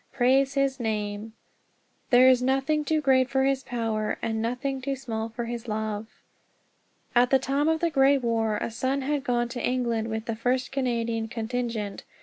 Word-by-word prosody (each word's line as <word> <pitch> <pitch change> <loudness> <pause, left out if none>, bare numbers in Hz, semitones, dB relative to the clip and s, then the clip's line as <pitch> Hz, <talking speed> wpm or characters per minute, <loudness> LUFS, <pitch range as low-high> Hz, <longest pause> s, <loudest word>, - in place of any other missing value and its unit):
Praise 270 +2 +2
his 275 -1 +1
name! 215 -1 -3 0.8
"There 255 0 +7
is 255 -1 +5
nothing 270 +4 +1
too 310 +1 +1
great 260 -2 +3
for 265 0 +1
his 270 0 +1
power, 225 -4 -2
And 220 -1 -1
nothing 255 +4 -2
too 275 +1 -2
small 230 -4 -4
for 235 +1 -5
his 235 0 -5
love!" 215 0 -3 1.1
At 245 0 +4
the 270 - +5
time 275 +3 0
of 320 0 +1
the 340 -1 +1
Great 275 -1 +4
War 225 -2 +1
a 230 - -3
son 260 +4 -1
had 290 0 -1
gone 240 -1 0
to 245 0 -5
England 235 -3 0
with 220 0 -4
the 230 - -2
first 250 +3 -1
Canadian 235 -4 -1
contingent. 225 -3 -3
245 Hz, 175 wpm, -26 LUFS, 225-270 Hz, 1.1 s, There